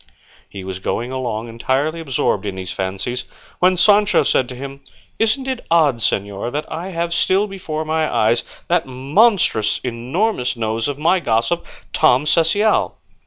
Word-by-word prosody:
He 100 -2 -8
was 95 0 -5
going 120 +6 -3
along 120 -4 -3
entirely 130 +7 -1
absorbed 125 -9 -1
in 100 - -4
these 95 -1 -5
fancies, 95 +7 -3 0.3
when 185 0 +4
Sancho 205 +2 +5
said 130 - +1
to 125 - -7
him, 140 +2 -8 0.4
"Isn't 225 +4 +1
it 260 -2 -3
odd, 155 -7 +4
señor, 100 0 -1
that 150 +1 -2
I 170 +3 -4
have 170 -2 -2
still 190 +4 +2
before 175 -6 -5
my 155 0 0
eyes 115 0 +2 0.2
that - - +1
monstrous 135 - +2
enormous 125 - -1
nose 110 0 -1
of 145 -1 -3
my 170 +5 +3
gossip, 120 +3 0 0.3
Tom 145 -2 +4
Cecial?" 170 +8 +2
140 Hz, 155 wpm, -19 LUFS, 115-170 Hz, 0.4 s, Sancho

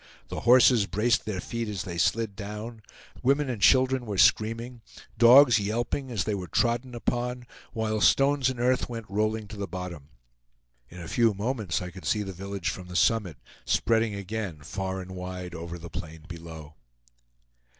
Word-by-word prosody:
The - - -4
horses 120 -3 +5
braced 115 +5 +1
their 105 -4 -3
feet 115 +5 -4
as 100 -3 -4
they 85 -4 -5
slid 110 +1 +1
down, 105 +2 -7 0.4
women 140 +1 +2
and 110 -5 -6
children 130 +1 +4
were 100 -2 -3
screaming, 115 +6 +2 0.3
dogs 120 +1 +7
yelping 120 +6 -2
as 115 -4 -1
they 105 - -2
were 95 -3 -4
trodden 120 +3 0
upon, 120 +2 -2 0.3
while 110 -1 -1
stones 135 +1 +4
and 130 -2 -5
earth 125 +1 +1
went 115 -2 -6
rolling 110 +2 -1
to 105 - -9
the 100 -1 -4
bottom. 90 -6 -7 0.8
In 90 - -11
a 85 - -7
few 115 +3 +2
moments 105 -5 -2
I 90 - -6
could 95 0 -11
see 105 -1 +1
the 95 -1 -6
village 95 -3 -4
from 90 -2 -9
the 90 - -9
summit, 95 - +2 0.3
spreading 110 -2 +1
again 100 -5 -5
far 95 +4 -4
and 95 0 -9
wide 90 -1 -6
over 85 +1 -6
the 85 0 -10
plain 80 -1 -8
below. 80 -3 -10
105 Hz, 170 wpm, -27 LUFS, 90-120 Hz, 0.8 s, dogs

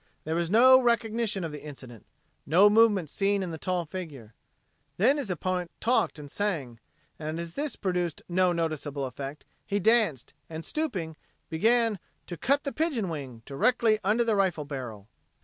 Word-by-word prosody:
There 160 - -3
was 170 0 0
no 260 +5 +7
recognition 230 -4 0
of 165 - -3
the 150 - -8
incident, 130 -7 -11 0.4
no 190 +7 +6
movement 210 -6 +4
seen 200 +5 0
in 180 - -4
the 160 - -6
tall 180 0 -1
figure. 150 - -8 0.6
Then 255 +10 +4
his 275 -8 -4
opponent 180 0 -2
talked 240 -7 +1
and 145 -2 -9
sang; 150 - -2 0.4
and 155 +1 -4
as 170 -1 -6
this 295 0 -3
produced 180 -4 -2
no 185 0 +2
noticeable 155 -4 -2
effect, 135 +3 -7 0.2
he 200 - -2
danced, 205 - +2 0.2
and 160 0 -6
stooping, 185 - -3 0.3
began 225 +5 +2 0.3
"to 175 - -6
cut 280 - +1
the 280 - -4
pigeonwing" 165 - -3
directly 215 - +2
under 215 +5 +2
the 225 -2 +1
rifle 185 -6 +1
barrel. 125 -8 -7
180 Hz, 160 wpm, -28 LUFS, 150-220 Hz, 0.6 s, no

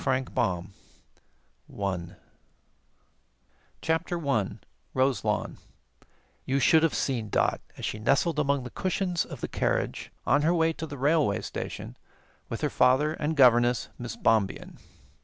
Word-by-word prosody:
The 130 0 0 1.4
Voyage 100 -1 -2
Ends 85 -1 -7 1.7
CHAPTER 165 +2 0
1 135 - -1 0.4
ROSELAWN 130 0 0 0.9
You 135 +1 0
should 160 +4 +5
have 165 -1 +2
seen 120 -6 -1
Dot - - +1 0.2
as - - -4
she 105 - -3
nestled 145 +7 +2
among 140 -2 +1
the 125 - -8
cushions 185 -2 -1
of - - -9
the - - -2
carriage - - -1
on 145 - +3
her 165 +4 +2
way 165 -1 +2
to 160 0 -6
the 145 -1 -7
railway 145 - +2
station - - -6 0.5
with - - -4
her - - 0
father 145 +5 +3
and 155 0 -2
governess, 120 -2 +5
Miss 120 -1 -5
Bombien. 110 -4 0
140 Hz, 135 wpm, -27 LUFS, 120-160 Hz, 1.7 s, should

